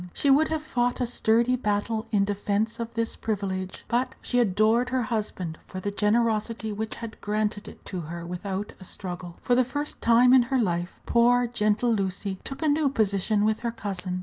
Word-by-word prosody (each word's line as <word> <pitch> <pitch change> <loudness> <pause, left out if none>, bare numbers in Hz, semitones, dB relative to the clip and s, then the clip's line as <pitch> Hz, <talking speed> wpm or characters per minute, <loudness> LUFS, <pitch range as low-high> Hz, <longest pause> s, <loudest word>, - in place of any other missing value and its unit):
She 280 - +2
would 300 +4 +5
have 315 -1 -2
fought 245 -4 0
a 250 - +1
sturdy 235 +1 +2
battle 220 -1 -1
in 200 -2 +3
defence 205 +2 -1
of 230 0 -4
this 230 0 -1
privilege; 190 -3 -3
but 245 +2 0
she 245 - 0
adored 220 +3 +3
her 255 -1 0
husband 205 -7 -3
for 185 - -6
the 205 +2 -3
generosity 220 +1 +1
which 220 +1 -3
had 230 -1 -8
granted 210 0 -1
it - - -12
to 185 - -4
her 170 +2 -6
without 190 +3 -4
a - - -11
struggle. 175 -2 -7
For 245 - +2
the 255 +1 +5
first 290 +4 -4
time 240 +2 +6
in 260 - +8
her 270 - +2
life, 175 -6 -1
poor, 245 +1 +4
gentle 230 0 +1
Lucy 195 -1 -2
took 270 +4 -6
a - - +2
new 295 -1 +3
position 210 -3 +1
with 215 0 +1
her 235 -1 -2
cousin. 190 -5 -4
220 Hz, 195 wpm, -26 LUFS, 200-240 Hz, -, in